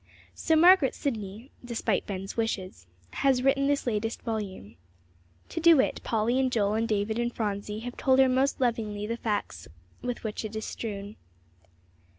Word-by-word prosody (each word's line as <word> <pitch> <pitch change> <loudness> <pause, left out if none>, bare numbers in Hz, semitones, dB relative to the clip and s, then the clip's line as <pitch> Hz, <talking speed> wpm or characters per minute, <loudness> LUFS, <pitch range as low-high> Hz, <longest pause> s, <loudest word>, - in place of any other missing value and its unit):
So 320 - +1
Margaret 340 -3 +6
Sidney, 220 -1 -4
despite 230 -4 -1
Ben's 195 -1 -5
wishes, 190 - -3 0.2
has 265 -2 +2
written 275 +1 +3
this 285 0 +1
latest 225 -1 -2
volume. 200 - -5 0.7
To - - -4
do 330 -2 +6
it, - - +1
Polly 235 +2 +1
and 260 -1 +1
Joel 210 -3 +1
and 225 +1 0
David 215 +1 -1
and 240 0 0
Phronsie 210 -1 -3
have 245 +1 -7
told 260 -1 +3
her 265 0 +6
most 260 +2 +1
lovingly 220 -4 -1
the 230 +2 -2
facts 205 - -3 0.3
with 245 -1 -4
which 215 0 -4
it 215 0 -6
is 220 - -3
strewn. 205 -2 -6
225 Hz, 165 wpm, -28 LUFS, 210-260 Hz, 0.7 s, Margaret